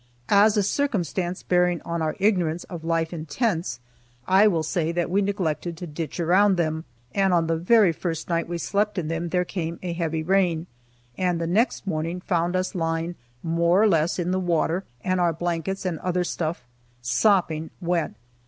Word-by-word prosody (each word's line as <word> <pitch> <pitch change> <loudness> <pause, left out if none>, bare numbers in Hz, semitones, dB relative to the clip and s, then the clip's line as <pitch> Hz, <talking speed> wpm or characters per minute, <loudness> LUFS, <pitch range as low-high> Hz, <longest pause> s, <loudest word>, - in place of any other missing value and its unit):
As 205 +2 +5
a 205 - +3
circumstance 190 - -1
bearing 180 -1 +2
on 170 0 -3
our 155 -1 -1
ignorance 180 -5 +1
of 170 -3 -8
life 165 0 0
in 160 -1 -6
tents, 175 - -1 0.5
I 195 +3 +6
will 165 -6 +1
say 165 0 -1
that 170 0 -1
we 200 +2 +3
neglected 175 -4 -2
to 180 - -6
ditch 155 -1 -5
around 190 +4 +4
them, 160 -1 -1 0.3
and 195 -1 +2
on 165 -1 +2
the 165 0 +1
very 190 +3 +4
first 165 -1 -4
night 170 -1 -1
we 175 - -2
slept 205 +4 -1
in 160 -4 -2
them 165 +1 -2
there 180 +1 +1
came 170 -2 -4
a 175 -2 -2
heavy 165 -2 -2
rain, 175 -2 +2 0.5
and 180 -2 +1
the 165 - -1
next 210 +9 +1
morning 165 -1 -2
found 175 0 0
us 185 +2 -1
lying 165 -1 -1 0.3
more 170 +2 +2
or - - +6
less 165 -3 +2
in 180 0 -1
the 185 - +1
water, 175 +1 0 0.2
and 185 -1 +1
our 170 -1 +2
blankets 175 +3 -3
and 170 -4 -2
other 180 0 0
stuff 165 -4 -3 0.4
sopping 160 - +2
wet. 175 -2 -1
175 Hz, 185 wpm, -24 LUFS, 165-185 Hz, 0.5 s, I